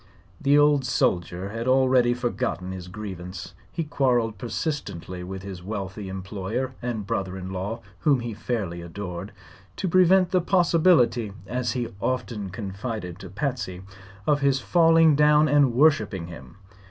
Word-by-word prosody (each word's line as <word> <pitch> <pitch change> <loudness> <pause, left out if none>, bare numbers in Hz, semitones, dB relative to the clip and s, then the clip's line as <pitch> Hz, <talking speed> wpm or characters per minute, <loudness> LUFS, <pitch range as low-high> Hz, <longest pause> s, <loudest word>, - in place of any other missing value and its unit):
The 140 +1 +4
old 145 -1 +4
soldier 90 -6 0
had 115 +3 -4
already 130 -2 +4
forgotten 115 -6 -2
his 90 -1 -7
grievance. 90 -2 -7 0.2
He 165 - -2
quarreled 120 -8 +1
persistently 115 - -4
with 95 +1 -7
his 95 -2 -7
wealthy 95 0 -5
employer 95 +7 -4
and 120 -4 -3
brother 95 -1 -2
in 95 0 -6
law 100 +5 -4 0.2
whom 140 -5 +3
he 120 -1 -4
fairly 100 -7 -3
adored 90 +2 -6 0.4
to - - -2
prevent 185 +1 +4
the 185 -2 +3
possibility 165 - +3
(as 125 +2 -2
he 120 -2 -2
often 115 -6 -2
confided 100 -1 -5
to 95 - -9
Patsy) 100 - -3 0.4
of 145 -1 +2
his 140 -1 +3
falling 165 0 +5
down 150 +1 +5
and 145 -3 +4
worshiping 115 - +2
him. 65 -7 -11
115 Hz, 140 wpm, -25 LUFS, 95-140 Hz, 0.4 s, falling